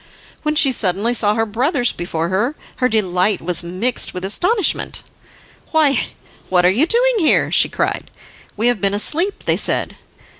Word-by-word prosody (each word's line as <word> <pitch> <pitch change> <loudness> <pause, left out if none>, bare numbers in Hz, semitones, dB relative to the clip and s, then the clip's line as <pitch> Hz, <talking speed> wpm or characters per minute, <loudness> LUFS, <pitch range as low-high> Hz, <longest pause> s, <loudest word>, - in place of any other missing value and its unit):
When 305 0 -2
she 280 -3 +4
suddenly 210 0 -1
saw 210 -3 0
her 225 0 0
brothers 245 - +1
before 165 -1 -4
her 220 +10 -1 0.2
her 255 - +1
delight 200 -2 +1
was 175 0 -1
mixed 185 +9 -2
with 180 +1 -5
astonishment. 360 - +1 0.7
"Why, 305 -3 +2 0.4
what 180 -1 +2
are 180 - +5
you 260 - +1
doing - - +3
here?" 320 - +2
she - - +4
cried. - - -3 0.5
"We 220 - -1
have 245 -4 +1
been 200 0 +1
asleep," 335 - -1
they - - 0
said. - - -1
225 Hz, 160 wpm, -18 LUFS, 185-295 Hz, 0.7 s, are